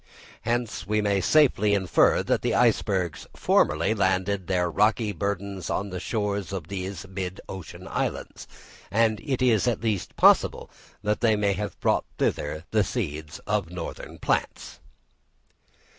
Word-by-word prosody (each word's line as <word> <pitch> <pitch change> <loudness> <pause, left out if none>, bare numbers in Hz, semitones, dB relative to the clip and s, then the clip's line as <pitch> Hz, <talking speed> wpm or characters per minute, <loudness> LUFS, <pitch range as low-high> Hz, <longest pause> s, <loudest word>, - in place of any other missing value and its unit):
Hence 120 -2 -2
we 105 +1 +1
may 100 -2 +1
safely 105 - +4
infer 95 -3 +3
that - - 0
icebergs 90 -5 +1
formerly 85 +7 +2
landed 95 -1 0
their 90 -2 +1
rocky 105 +4 +2
burdens 100 -2 -3
on 100 0 -2
the 90 - -4
shores 100 -2 -2
of 90 -5 -5
these 95 -1 -5
mid 95 0 -5
ocean 95 -4 -8
islands, - - -3 0.4
and 110 +1 +2
it 130 -4 -1
is 120 -2 +3
at 120 - 0
least 105 -6 -2
possible - - +4 0.3
that 105 +1 0
they 115 -3 +4
may 100 -1 +1
have 105 0 -5
brought - - +1
thither 75 +3 -1
the 110 -1 +3
seeds 80 - -4
of 105 -4 -1
northern 90 0 -7
plants. - - -2
100 Hz, 140 wpm, -26 LUFS, 90-105 Hz, 0.4 s, safely